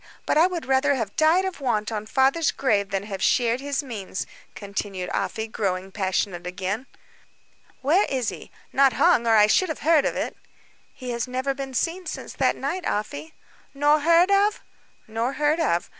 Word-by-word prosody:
But - - +1
I 320 +4 +6
would 355 -3 -5
rather 270 +2 +2
have 225 -6 -4
died 325 +5 +4
of 375 -6 -5
want 225 -4 -1
on 215 -1 -4
father's 270 +7 +2
grave 205 -7 0
than 195 -1 -2
have 195 -2 -6
shared 240 -1 +2
his 285 +1 -2
means," 210 -7 -5 0.3
continued 200 -2 -5
Afy, 220 -1 -2
growing 195 -3 -3
passionate 190 -2 -2
again. 195 +7 -4 1.0
"Where 335 +9 +4
is 255 -4 -1
he? - - -9 0.2
Not 270 -2 +4
hung, 235 0 +3
or 225 - +5
I 210 -1 +7
should 340 - +2
have 315 - -5
heard 315 -1 +4
of - - -1
it." - - -3 0.6
"He 250 -2 -7
has 235 +1 -2
never 260 +2 -2
been 270 -1 -6
seen 350 +6 -1
since - - -6
that - - +1
night, 370 - -3
Afy." 285 +9 -4 0.4
"Nor 295 +2 +4
heard 335 +5 +4
of?" 405 +1 +3 0.5
"Nor 225 +4 -2
heard 300 +3 +1
of. 175 - +1
255 Hz, 180 wpm, -24 LUFS, 210-300 Hz, 1.0 s, I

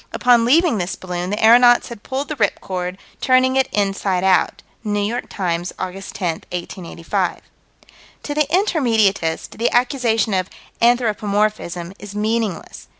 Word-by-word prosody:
Upon 240 -2 +3
leaving 295 - +3
this 175 +1 -3
balloon, 180 -1 -5
the 210 +2 -2
aeronauts 240 +1 +6
had 235 -4 -9
pulled 270 +4 -4
the 305 - -3
"rip 205 -4 +1
cord," 180 -1 -4 0.2
"turning 260 0 +3
it 265 0 +2
inside 195 -2 0
out." 190 -1 +2 0.2
(New 205 -2 -1
York 215 +4 -2
Times, 175 -2 -2
Aug. 185 -1 -4 0.2
10, 175 -5 -3
1885.) 175 -1 -4 0.8
To 290 - -4
the 300 -1 +1
Intermediatist, 225 - +1
the 235 - +2
accusation 240 -4 +1
of 185 -1 0 0.3
"anthropomorphism" 210 -6 0
is 205 0 -10
meaningless. 215 -2 -2
210 Hz, 140 wpm, -20 LUFS, 185-245 Hz, 0.8 s, aeronauts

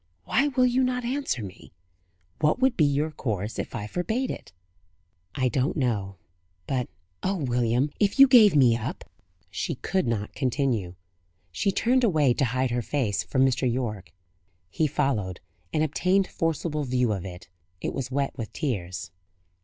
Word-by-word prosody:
Why 280 - +2
will 255 -3 +2
you 250 +1 +2
not 250 -1 -1
answer 260 - -2
me? 95 -4 -11 0.7
What 150 +5 +3
would 265 0 +3
be 155 - +4
your 145 +2 +1
course 110 -7 -3
if - - -4
I 105 -4 -4
forbade 220 - -2
it?" - - -8 0.8
"I 130 - +1
do 130 +2 +1
not - - -3
know. 105 -8 -1 0.5
But, 125 +4 -2 0.3
Oh, 195 +1 0
William, 125 -2 +1
if 205 -1 +2
you 275 - +10
gave 220 -9 +7
me 125 -5 +5
up 115 - -4 0.3
" 85 -1 -42
She - - -2
could 190 -7 -1
not 105 -3 -2
continue. 125 -9 -1 0.6
She 195 - 0
turned 250 +6 +2
away 155 - +3
to 135 - +1
hide 130 +1 0
her 120 0 0
face 120 -4 -1
from 130 0 +2
Mr. 130 -1 +1
Yorke. 105 -9 -3 0.6
He 155 - +1
followed 130 - -1 0.3
and 155 - +1
obtained 185 +6 +2
forcible 160 -2 -2
view 125 -4 +1
of 95 -3 -4
it. 90 -1 -9 0.3
It - - -3
was 130 -2 -3
wet 140 +1 -1
with 115 -5 -6
tears. 100 - -3
135 Hz, 170 wpm, -26 LUFS, 115-170 Hz, 0.8 s, you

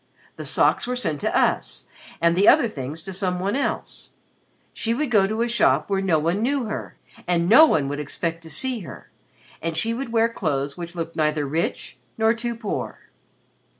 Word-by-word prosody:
The - - -7
socks - - +2
were 250 - -1
sent 155 - -2
to - - 0
us - - 0 0.3
and 170 0 +3
the 195 +3 +3
other 285 -5 +6
things 150 - -7
to 195 - -6
some 180 -1 -1
one 195 +5 -1
else. 280 - -3 0.6
She 230 0 -1
would 290 0 -2
go 200 -4 +4
to 220 +3 -1
a - - 0
shop 235 -3 +2
where 195 -1 +1
no 185 -5 +2
one 170 +6 0
knew 270 +3 +1
her 215 0 -6 0.3
and 170 -1 +1
no 260 - +8
one 145 - +1
would 145 +1 -3
expect 165 +3 -3
to 165 - -11
see 245 - -2
her 185 - -11 0.5
and 165 0 -3
she 225 +7 0
would 245 0 -5
wear 230 0 +3
clothes 145 -10 -2
which 170 0 -8
looked 165 -1 -5
neither 155 -2 +1
rich 150 -2 -3 0.2
nor 220 0 +3
too 235 0 -4
poor." 220 -3 -5
190 Hz, 195 wpm, -23 LUFS, 160-230 Hz, 0.6 s, no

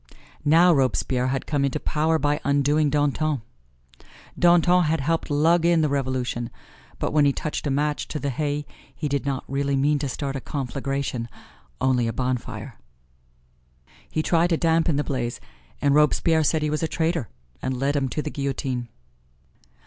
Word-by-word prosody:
Now, 170 +4 +6
Robespierre 130 -2 +1
had 130 0 -2
come 145 -2 0
into 140 +2 0
power 160 +2 +1
by 145 0 0
undoing 145 +2 +2
Danton. 145 -2 0 1.0
Danton 175 0 +5
had 160 +1 +1
helped 165 +5 -1
lug 160 +4 +3
in 170 -1 +4
the 155 - +2
Revolution, 130 -4 -2 0.5
but - - -2
when 150 -1 +4
he 140 - +4
touched 150 +1 -4
a - - +1
match 145 +2 0
to 155 - -4
the 140 -1 -2
hay 145 +2 -2 0.3
he 155 - -3
did 140 0 -2
not 135 -1 -1
really 140 +1 0
mean 145 +2 +2
to 140 -1 -2
start 135 +1 -3
a 135 - -4
conflagration, 135 -3 -3 0.5
only 130 -3 +2
a 115 - -2
bonfire. 125 -1 -4 1.3
He 155 - -1
tried 170 +1 +2
to 165 - +2
dampen 165 -1 +2
the 145 - +1
blaze, 120 -4 -3 0.4
and 140 -1 +4
Robespierre 155 +2 +3
said 155 +1 +1
he 150 - 0
was 155 - -1
a 160 - +1
traitor 160 - -1 0.3
and 130 -1 -2
led 140 +2 0
him 135 -2 0
to 150 - -3
the 150 - -4
guillotine. 135 -3 -3
145 Hz, 170 wpm, -24 LUFS, 135-155 Hz, 1.3 s, Now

